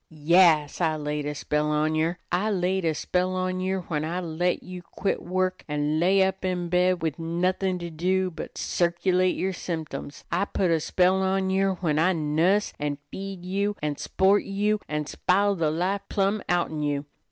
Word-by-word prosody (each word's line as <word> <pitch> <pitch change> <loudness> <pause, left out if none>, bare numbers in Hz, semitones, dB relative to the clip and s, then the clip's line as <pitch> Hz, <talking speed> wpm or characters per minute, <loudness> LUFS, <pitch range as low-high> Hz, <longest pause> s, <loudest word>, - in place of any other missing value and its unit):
"Yas, 160 0 +3
I 160 -2 +2
laid 150 -1 -3
a 150 - -3
spell 150 +1 -1
on 150 +1 +1
yer! 160 +3 0
I 195 +5 +1
laid 185 -2 0
a 160 -1 +1
spell 180 +3 0
on 185 0 -1
yer 190 0 -1
when 155 -3 -3
I 170 +3 -2
let 175 +1 -1
you 180 -1 -8
quit 195 +3 -3
work, 185 +1 -1
an' 150 +1 0
lay 190 +3 +4
up 190 0 -1
in 180 -2 -1
bed 180 0 +2
wid 160 -1 -2
nothin' 180 +3 0
to 170 -1 -6
do 185 +3 0
but 160 - -8
to - - -5
circulate 180 +1 +1
yer 190 +1 -1
symtems. 160 -5 -6
I 180 +4 +1
put 190 -3 0
a 165 - +3
spell 185 +4 +2
on 190 0 +1
yer 195 0 +2
when 155 -4 +1
I 185 +4 +3
nuss 165 +6 +1
you - - -4
an' 145 -1 -2
feed 195 -2 -6
you 200 +2 -1
an' 150 -1 -1
s'port 195 +5 +2
you 210 +2 0
an' 150 0 -2
spile 200 +6 +1
the 165 -5 0
life 180 +5 -1
plumb 200 +1 +1
outen 170 -3 0
you. 145 -1 -1
180 Hz, 195 wpm, -26 LUFS, 155-190 Hz, -, lay